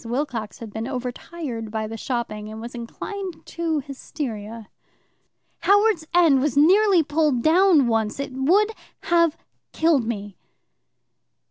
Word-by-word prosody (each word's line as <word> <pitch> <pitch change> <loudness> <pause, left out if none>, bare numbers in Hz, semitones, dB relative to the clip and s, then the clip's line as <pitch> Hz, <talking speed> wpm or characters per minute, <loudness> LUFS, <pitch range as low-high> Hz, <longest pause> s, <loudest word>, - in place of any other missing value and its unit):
Wilcox 235 -3 -3
had 220 -3 -9
been 220 +1 -4
overtired 250 -1 -5
by 220 0 -3
the 220 +1 -6
shopping, 215 -3 -4
and 220 0 -8
was 235 +1 -8
inclined 350 - -7
to 325 -3 -2
hysteria. 230 -6 -7 0.9
"Howards 405 -5 +3
End 330 -6 +5
was 285 -1 -1
nearly 370 +3 +5
pulled 295 -5 +1
down 335 -3 +5
once. 225 0 0
It 280 -1 -4
would 365 +12 +3 0.3
have 335 -2 +2 0.4
killed 315 -7 +2
me." 205 -4 -5
270 Hz, 125 wpm, -23 LUFS, 230-335 Hz, 0.9 s, End